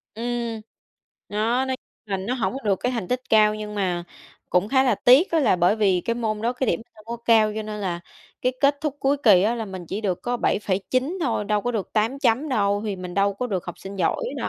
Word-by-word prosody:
Ừm. 235 -1 -3 0.7
Đó, 230 +5 +1
nói 260 0 -1 0.3
là 195 - -1
nó 195 +6 -3
hổng 245 - -1
có - - -3
được 195 -3 +1
cái 250 - 0
thành 225 -7 -3
tích 250 0 0
cao, 215 -1 +5
nhưng 210 0 -6
mà 180 -4 -1 0.5
cũng 180 +3 +2
khá 265 +2 +4
là 260 - +3
tiếc 265 +9 +5
á 325 - +3
là 250 -9 +3
bởi 180 +4 +3
vì 195 -4 +2
cái 230 - 0
môn 220 -3 -2
đó 235 +2 +1
cái 255 +1 -2
điểm 230 - 0
không 215 - -17
có 235 +1 -4
cao 220 -2 +4
cho 220 - -2
nên 210 0 -6
là 175 -3 -2 0.4
cái 255 - +2
kết 285 0 +3
thúc 295 -2 -2
cuối 275 +1 +2
kỳ 195 -6 +7
á 220 +4 +2
là 230 -2 -3
mình 190 -4 -8
chỉ 195 +6 -4
được 190 -5 -2
có 245 0 -1
7,9 255 - 0
thôi, 230 -8 0
đâu 210 0 +1
có 245 - -1
được 215 -5 -3
8 225 +5 +1
chấm 270 +2 +1
đâu, 205 -5 +1
thì 200 -2 -2
mình 180 -1 -7
đâu 200 0 +2
có 250 +6 -3
được 190 -7 -3
học 175 - -7
sinh 195 +1 -8
giỏi 190 - 0
đâu. - - -2
215 Hz, 255 wpm, -24 LUFS, 200-245 Hz, 0.7 s, kỳ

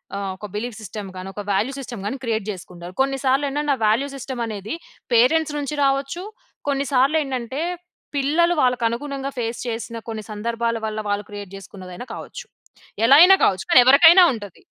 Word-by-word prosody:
ఆహ్, 200 -1 -3
ఒక 210 - -8
believe 230 +2 -4
system 205 0 -7
గాని, 185 +1 -7
ఒక 205 - -5
వాల్యూ 230 +8 0
సిస్టమ్ 235 -6 -7
గాని, 240 +7 -3
క్రియేట్ 220 -3 -1
చేసుకుంటారు. 180 -1 -10
కొన్నిసార్లేంటంటే 275 +2 0
ఆ - - -19
వాల్యూ 235 +7 +2
సిస్టమనేది 235 -3 -5 0.4
పేరెంట్స్ 295 +6 +3
నుంచి 290 0 -3
రావచ్చు, 275 +5 0 0.5
కొన్నిసార్లేంటంటే 275 -1 0 0.6
పిల్లలు 330 +5 +2
వాళ్ళకి 250 -1 +1
అనుగుణంగా 275 +3 -4
ఫేస్ 230 0 -3
చేసిన 230 0 -4
కొన్ని 220 -1 -5
సందర్భాల 230 +2 -2
వల్ల 215 0 -3
వాళ్ళు 205 0 -1
క్రియేట్ 205 -2 -8
చేసుకున్నదైనా 190 +1 -10
కావచ్చు. 485 -1 -8 0.6
ఎలా 275 +5 +7
అయినా 385 +2 +9
కావచ్చు. 190 -1 0
మరీ - - +8
ఎవరికైనా 325 +7 +8
ఉంటది. 205 -5 -9
240 Hz, 150 wpm, -22 LUFS, 210-275 Hz, 0.6 s, అయినా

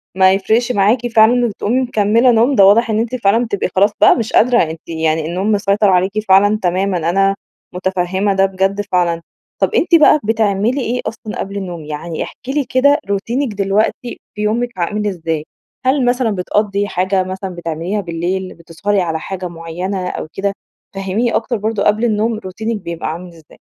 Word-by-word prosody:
ما 190 0 +5
يفرقش 225 +5 +1
معاكِ 225 +4 +2
فعلًا، 235 +1 +4
تقومي 245 +5 +1
مكملة 230 +1 +3
نوم، 240 +4 +3
ده 195 - +6
واضح 225 +4 +5
إن 215 0 +1
أنتِ 235 +2 -2
فعلًا، 230 +1 +2
بتبقي 200 -3 -2
خلاص 200 +2 +4
بقى - - +7
مش 225 -2 -3
قادرة، 240 -1 +4
أنتِ 160 0 -6
يعني، 160 -1 0
النوم 185 +6 -1
مسيطرعليكِ 200 -2 +2 0.2
فعلًا 205 +3 +4
تمامًا، 180 -2 0
أنا 195 +2 +2 0.4
متفهمة 190 +2 -1
ده 195 0 +3
بجد 195 +1 -1
فعلًا. 170 -2 +1 0.4
طب - - +1
أنتِ 340 -1 +3
بقى، 305 -1 +6
بتعملي 220 +3 +1
إيه 245 +1 -2
أصلًا 220 -1 -6
قبل 200 +1 -4
النوم؟ 175 -5 -6
يعني 155 +2 -5
احكي 260 - -8
لي 285 -1 0
كده، 285 +4 +3
روتينِك 230 +5 -1
دلوقتي، 205 +5 -1 0.2
في 210 - -5
يومِك، 230 +3 0
عامل 210 +5 -1
إزاي؟ 165 -5 -3 0.4
هل 260 0 +2
مثلًا 245 -2 +1
بتقَضِّي 200 +1 -1
حاجة، 185 +1 0
مثلًا 185 0 -6
بتعمليها 170 +4 -3
بالليل، 180 +2 -3
بتسهري 170 +4 -2
على 165 -2 -2
حاجة 185 +1 -5
معيّنة، 175 +3 -5
أو - - -5
كده، 200 0 -2 0.4
فهّميني 195 +5 -1
أكتر 235 +1 -1
برضو 215 0 -2
قبل 215 +3 +2
النوم، 220 0 0
روتينِك 220 +2 -4
بيبقى 170 -1 -5
عامل 175 +3 -7
إزاي؟ 160 -2 -18
200 Hz, 170 wpm, -17 LUFS, 180-225 Hz, 0.4 s, بقى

